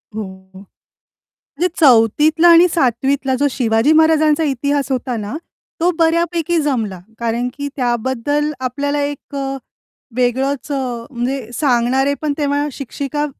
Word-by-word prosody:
हो. 220 - -3 0.3
म्हणजे 195 +1 -17 0.9
4थीतला 300 +5 +4
आणि 340 +1 +7
7वीतला 265 -1 +1
जो 285 - +3
शिवाजी 230 +2 +2
महाराजांचा 315 -1 +3
इतिहास 280 0 -1
होता 255 -1 -2
ना, 210 +4 -5 0.4
तो 340 +2 +2
बऱ्यापैकी 335 0 +1
जमला 225 -10 -2 0.2
कारण, 235 +1 -1
की 285 0 -5
त्याबद्दल 260 +4 -1
आपल्याला 285 +3 -2
एक 285 0 -6
अ, 270 -1 -3 0.6
वेगळच 265 +3 -1
अ, - - 0 0.4
म्हणजे 245 -1 -3
सांगणारे 260 +1 +1
पण 300 -2 -1
तेव्हा 290 0 0
शिक्षिका 280 +2 -4
275 Hz, 120 wpm, -18 LUFS, 245-295 Hz, 0.9 s, आणि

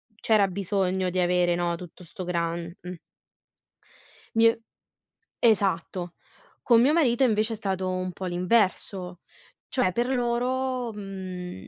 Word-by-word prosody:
c'era 215 -2 +3
bisogno 190 -1 -1
di 185 +1 -2
avere, 175 -1 +2
no, 175 -1 0
tutto 180 +1 -11
sto 180 +2 -8
gran 170 -1 -2
mh. 180 0 -7 1.4
Mi 225 0 +6
è 230 - +4 0.8
esatto. 185 -5 +1 0.5
Con 235 -2 +5
mio 265 +4 +5
marito 270 -6 +3
invece 220 -2 +2
è - - -3
stato 190 -3 -2
un 185 0 -2
po' 185 +2 -7
l'inverso, 180 -1 0 0.5
cioè 250 -9 +1
per 240 +4 0
loro, 250 0 -1
mhmm, 185 - -7
190 Hz, 130 wpm, -26 LUFS, 180-230 Hz, 1.4 s, Mi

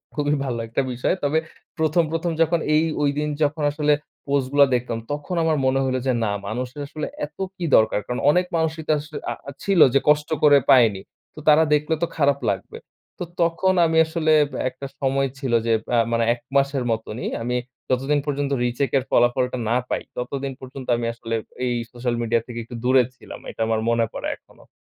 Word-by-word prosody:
খুবই 145 0 +1
ভালো 120 -3 -2
একটা 115 +4 0
বিষয়। 125 +9 0
তবে 145 +2 +2 0.4
১ম, 160 +2 +3
প্রথম 165 +1 -1
যখন 165 +1 +3 0.2
এই 155 - +4 0.2
ঐদিন 145 +1 0 0.2
যখন 150 +1 0
আসলে 150 0 +2 0.3
পোস্ট 140 -2 +1
গুলা 145 0 +7
দেখতাম, 120 -2 -2
তখন 150 +5 -3
আমার 160 -2 +2
মনে 130 +1 +2
হইলো 130 -1 0
যে 130 - +3
না 105 - 0 0.2
মানুষের 125 +6 -4
আসলে 155 +1 -5 0.2
এত 150 - -17 0.2
কি 175 - -4
দরকার! 110 -1 +4
কারণ 125 - -3
অনেক 180 +3 +2
মানুষই 160 0 -1
তো - - +2
আস 145 - -6 0.3
আ - - -1 0.3
ছিল 195 -4 +2
যে 140 - +5
কষ্ট 150 0 +3
করে 145 -1 +7
পায়নি। 110 -7 +5 0.3
তো - - -9
তারা 155 +1 +7
দেখলে 150 +2 +1
তো 170 - +2
খারাপ 140 -2 +3
লাগবে। 95 0 -6 0.4
তো - - -2 0.2
তখন 170 +3 +2
আমি 160 0 +1
আসলে 160 -1 0
এব 145 - -5 0.2
একটা 130 +2 -8
সময় 135 0 +1
ছিল 130 -4 -2
যে 115 - +2 0.2
আ - - +4
মানে 115 0 +2
১ 120 - -10 0.2
মাসের 140 -1 +2
মতনই। 110 +1 -3 0.2
আমি 125 +1 -1 0.3
যতদিন 135 +3 +1
পর্যন্ত 140 -1 -2
রিচেক 125 +3 -1
এর 130 - 0
ফলাফলটা 125 +1 +2
না 120 - +3
পাই, - - -1 0.2
ততদিন 135 +2 -3
পর্যন্ত 130 0 -9
আমি 120 - -3
আসলে 115 0 -4 0.3
এই 120 -1 0 0.2
সোশ্যাল 120 -1 -2
মিডিয়া 115 0 +1
থেকে 120 -1 -6
একটু 120 +1 -10
দূরে 130 0 +5
ছিলাম। - - -11
এটা - - -7
আমার 110 -1 0
মনে 115 -1 +2
পড়ে - - -4
এখনোও। - - -22
140 Hz, 195 wpm, -23 LUFS, 125-150 Hz, 0.4 s, গুলা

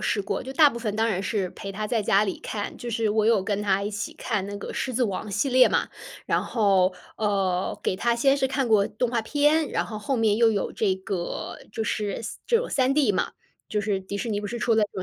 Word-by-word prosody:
试 205 - 0
过， - - -3
就 260 - -7
大 300 -1 +7
部 235 - -6
分 215 -3 -3
当 225 +1 +2
然 195 -4 -1
是 190 -2 -1
陪 195 - -7
她 210 +2 -4
在 225 0 0
家 200 +1 +3
里 190 - -3
看， 205 -2 -4
就 240 - -6
是 225 -2 0
我 215 0 +2
有 220 -4 +4
跟 205 0 -1
她 200 -1 +1
一 205 - -2
起 215 +1 -5
看 210 -5 -2
那 205 0 -5
个 - - -7
《狮 255 - -3
子 245 +1 +2
王》 200 +1 -3
系 215 +8 0
列 255 0 +6
嘛。 - - 0 0.3
然 - - +1
后， 195 -5 +2 0.2
呃， 195 -3 0
给 - - 0
她 235 +5 +1
先 270 +3 +4
是 265 -2 0
看 265 -1 0
过 215 -3 +4
动 235 +3 -1
画 235 - +1
片， 295 +6 +2
然 - - 0
后 215 -2 -6
后 255 +5 -1
面 220 -2 +2
又 230 -1 +5
有 205 -3 -1
这 200 -4 +1
个， 190 -2 -4
就 220 +1 -3
是 210 -1 -2
3 - - -6
这 465 - +4
种 485 - -1
3D 265 -3 +3
嘛， - - -1 0.4
就 210 -1 -1
是 200 -2 0
迪 190 +2 -6
士 225 +3 -3
尼 205 - -1
不 205 - -4
是 240 +3 -4
出 235 - +1
了 220 - +4
这 205 - +1
215 Hz, 270 characters per minute, -25 LUFS, 200-240 Hz, 0.4 s, 大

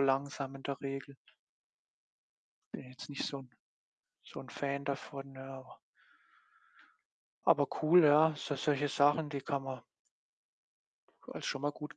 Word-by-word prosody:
langsam 135 0 +1
in 135 - -12
der 140 -1 -3
Regel. 135 0 -5 1.6
Bin 125 - -7
jetzt 130 0 -10
nicht 140 - -2
so 140 - -3
'n 130 -2 -12 0.7
so - - -10
'n - - -9
Fan 140 0 -2
davon, 140 0 -5
ja, 135 0 -8
auch 130 - -15 1.7
Aber 145 -1 +6 0.2
cool, 165 +2 +8
ja, 155 +1 +7
so 145 - -3
solche 145 +1 +1
Sachen, 145 +3 +4
die 140 -2 -3
kann 140 +1 -1
man 130 -2 -5 1.5
als - - -7
schon 135 - -1
mal 145 - +2
gut 150 -1 -8
140 Hz, 140 wpm, -34 LUFS, 135-145 Hz, 1.7 s, cool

